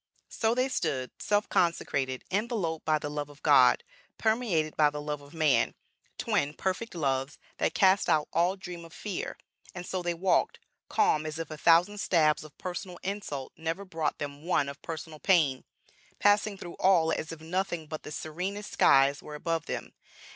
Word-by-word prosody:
So 225 +1 0
they 255 +1 +2
stood, 130 - -2
self 205 0 +1
consecrated, 140 -6 0
enveloped 195 -6 -1
by 155 -1 +3
the 145 - -5
love 145 0 -4
of 145 0 -17
God, - - +6 0.3
permeated 220 -9 +1
by 150 -1 +5
the 150 0 -6
love 150 0 -4
of 145 +3 -15
man, 155 -4 +2 0.4
twin 145 +2 0
Perfect 190 +3 -3
Loves 135 -2 -1 0.2
that - - 0
cast 190 0 +4
out 150 -1 +3
all 175 +3 +2
dream 180 -3 -8
of 165 0 -13
fear. 205 -4 -5 0.4
And 175 0 -6
so 185 0 -3
they 175 -1 -1
walked, 180 +2 +2 0.3
calm 155 - +3
as 155 0 -5
if 165 -1 -5
a - - -4
thousand 170 +6 +4
stabs 155 -6 +3
of 155 -2 -14
personal 180 0 -5
insult 185 -9 -4
never 165 +5 -3
brought 160 -4 -2
them 145 0 -6
one 165 -5 +1
of 140 +1 -9
personal 160 -1 -7
pain, 155 -9 +3 0.5
passing 205 0 +3
through 175 -2 -9
all 170 -4 +4
as 160 0 -2
if 165 - -7
nothing 175 0 -2
but 155 0 -6
the - - -9
serenest 180 +7 -4
skies 135 +1 +4
were 150 - -8
above 165 0 -2
them. - - -5
165 Hz, 175 wpm, -29 LUFS, 150-190 Hz, 0.5 s, God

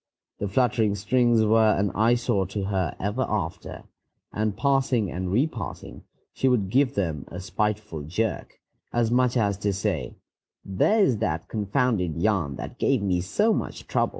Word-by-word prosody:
The 100 - -2
fluttering 110 -1 +1
strings 115 +2 +2
were 110 0 +4
an 100 0 0
eyesore 115 -3 +2
to 100 +2 -4
her 95 -4 -1
ever 105 +6 -2
after, - - -4 0.5
and, 105 -2 -1
passing 130 -7 +1
and 90 +1 -3
repassing, 120 -1 -3 0.3
she 135 - 0
would 105 -7 +1
give 135 +2 +2
them 80 -8 -2
a 90 - -8
spiteful 100 -2 -2
jerk, 95 +9 -3 0.3
as 120 -1 +1
much 125 0 +2
as 100 -4 +1
to 100 -1 0
say, 95 +1 -2 0.5
"There 205 - +2
is 125 - +2
that 80 -7 -2
confounded 105 - 0
yarn 90 -8 +1
that - - -8
gave 130 -7 +2
me 90 -3 +1
so 205 - +1
much - - -4
trouble." - - +1
105 Hz, 155 wpm, -25 LUFS, 95-120 Hz, 0.5 s, were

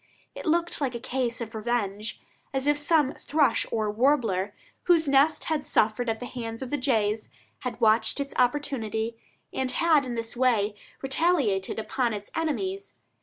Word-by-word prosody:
It - - -7
looked 340 0 +1
like 260 -3 -1
a - - -3
case 245 -1 -2
of 225 0 -5
revenge; 215 -2 -2 0.4
as 265 0 0
if 295 0 +4
some 295 -2 +3
thrush 285 -6 +2
or 215 -2 0
warbler, 220 -5 +2 0.3
whose 335 -3 +4
nest 280 +3 +4
had 310 -3 -2
suffered 225 +3 +2
at 220 0 -1
the 245 - -5
hands 230 -1 -5
of 255 - -7
the 290 - +1
jays, 220 -5 0 0.3
had 250 -3 -5
watched 220 +2 +3
its 280 0 -3
opportunity, 235 -4 0 0.4
and 260 -1 -1
had 310 -4 +3
in 240 - -3
this 230 0 -4
way 230 -5 +2 0.3
retaliated 270 - +1
upon 235 +1 -1
its 205 0 -8
enemies. 375 +5 -2
245 Hz, 165 wpm, -27 LUFS, 220-290 Hz, 0.4 s, if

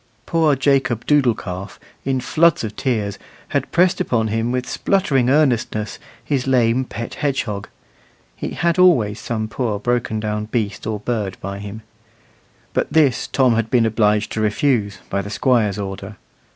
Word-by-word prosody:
Poor 160 -3 +2
Jacob 135 -3 +1
Doodle 140 -6 +3
calf, 95 +2 -7 0.3
in 135 -1 +1
floods 165 +4 +3
of 110 -1 -5
tears, 115 -7 -1 0.3
had - - -1
pressed 180 +1 +3
upon 110 -3 0
him 115 +2 -1
with 125 0 -2
spluttering 140 -11 +1
earnestness 120 -7 +1 0.3
his 135 -3 -1
lame 125 0 +3
pet 115 -1 -6
hedgehog 120 -9 -2 0.7
(he - - -4
had 170 +1 +1
always 120 - +4
some 110 -2 -3
poor 110 -2 -2
broken 115 0 -1
down 105 0 -2
beast 105 -2 -3
or 110 -1 -2
bird 105 -5 -2
by 100 +1 -5
him); 105 +2 -8 0.9
but - - -1
this 145 -5 +3
Tom 130 -3 +3
had 115 -1 0
been 120 -2 +3
obliged 105 -1 +2
to 110 - -2
refuse, 105 -2 +1
by 100 - -1
the 100 - -7
Squire's 110 -3 +1
order. 100 +1 -6
115 Hz, 155 wpm, -20 LUFS, 105-135 Hz, 0.9 s, always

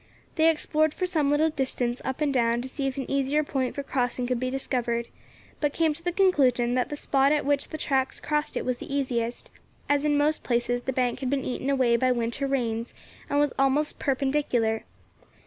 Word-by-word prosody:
They 320 0 +4
explored 310 -1 +1
for 365 - -1
some 315 -6 +1
little 305 +2 +3
distance 255 -3 -2
up 265 +3 -4
and 290 -2 +1
down 235 -1 +2
to - - -5
see 270 +1 -3
if 265 - -4
an 270 - -2
easier 275 +2 +1
point 265 -3 -2
for 280 - -3
crossing 250 -2 -1
could 250 -1 -1
be 255 +1 -1
discovered, 240 -3 -1 0.5
but 295 -1 0
came 320 -2 +2
to 320 - -8
the 350 - 0
conclusion 265 -11 +3
that 250 0 0
the 295 - -3
spot 275 -1 +2
at 300 -2 +1
which 285 -1 +1
the 310 - -6
tracks 265 -3 0
crossed 300 0 -1
it - - -3
was 250 -1 -1
the - - -8
easiest, 245 -4 -2 0.4
as 290 0 +2
in 295 -1 +2
most 300 +1 +2
places 240 0 0
the 265 - -2
bank 250 -2 0
had 260 - -2
been 275 -1 -1
eaten 260 +2 -3
away 255 -4 +3
by 255 +2 +2
winter 240 +3 -1
rains 235 -4 -2 0.3
and 285 - +2
was 290 -2 +2
almost 275 +3 +1
perpendicular. 265 -5 0
270 Hz, 210 wpm, -26 LUFS, 245-290 Hz, 0.5 s, They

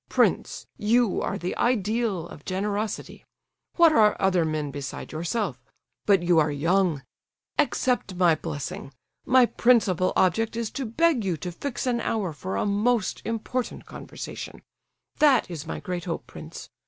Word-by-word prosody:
Prince, - - +1
you 225 0 +2
are - - -2
the 175 +2 -3
ideal 220 -6 0
of 145 - -12
generosity; 205 +3 -3 0.5
what 335 -2 +6
are 215 -7 +4
other 185 -3 +3
men 155 -2 -2
beside 140 -1 -6
yourself? 170 - -2 0.5
But 195 -4 +4
you 175 -1 +4
are 155 0 +3
young—accept 175 - -1
my 175 -2 +4
blessing! 145 -3 -5 0.4
My 255 -1 +6
principal 220 -8 +3
object 215 +6 +2
is 230 -2 -3
to 270 -3 -4
beg 295 +1 +2
you 180 -4 -1
to 180 +3 -5
fix 265 +9 -4
an 240 -2 0
hour 200 -7 -1
for 100 -10 -5
a - - 0
most 210 +2 +1
important 230 +2 -3
conversation—that 275 -10 -2
is 160 -4 -6
my - - -4
great 180 -3 -4
hope, 170 -2 -4
prince. - - -10
195 Hz, 140 wpm, -26 LUFS, 170-235 Hz, 0.5 s, what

